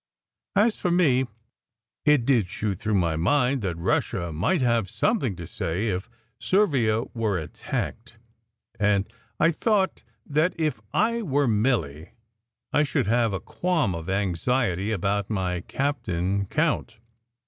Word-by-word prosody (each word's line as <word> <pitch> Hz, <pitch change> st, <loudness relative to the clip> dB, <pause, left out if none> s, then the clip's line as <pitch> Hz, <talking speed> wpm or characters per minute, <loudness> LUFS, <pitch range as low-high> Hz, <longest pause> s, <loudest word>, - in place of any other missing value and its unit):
As 215 Hz, +3 st, +3 dB
for 180 Hz, -, -1 dB
me, 140 Hz, -8 st, +3 dB, 0.8 s
it 150 Hz, -5 st, +4 dB
did 120 Hz, -9 st, +2 dB
shoot 105 Hz, -3 st, -3 dB
through 105 Hz, -1 st, 0 dB
my 85 Hz, -4 st, +2 dB
mind 125 Hz, -, +2 dB
that 90 Hz, -5 st, -2 dB
Russia 85 Hz, 0 st, -1 dB
might 130 Hz, -, +1 dB
have 115 Hz, -5 st, +2 dB
something 130 Hz, -, 0 dB
to 85 Hz, -1 st, -7 dB
say 90 Hz, +8 st, -2 dB
if 95 Hz, 0 st, -3 dB, 0.3 s
Servia 130 Hz, -, +2 dB
were 110 Hz, -5 st, 0 dB
attacked; 110 Hz, +8 st, -5 dB, 0.6 s
and 105 Hz, -1 st, +2 dB, 0.3 s
I 165 Hz, -, +5 dB
thought 195 Hz, +2 st, +1 dB, 0.2 s
that 155 Hz, +5 st, +1 dB
if 155 Hz, -9 st, -1 dB
I 230 Hz, +2 st, +1 dB
were 145 Hz, -, +1 dB
Milly 105 Hz, -, 0 dB, 0.6 s
I 150 Hz, -, +4 dB
should 145 Hz, -2 st, +1 dB
have 115 Hz, +1 st, +2 dB
a 95 Hz, -, -2 dB
qualm 170 Hz, -, 0 dB
of 85 Hz, +1 st, -6 dB
anxiety 95 Hz, +1 st, 0 dB
about 100 Hz, 0 st, -1 dB
my 95 Hz, -4 st, -1 dB
cap 140 Hz, +9 st, -2 dB
tain 95 Hz, +2 st, -1 dB
count. -, -, 0 dB
110 Hz, 135 wpm, -25 LUFS, 95-145 Hz, 0.8 s, I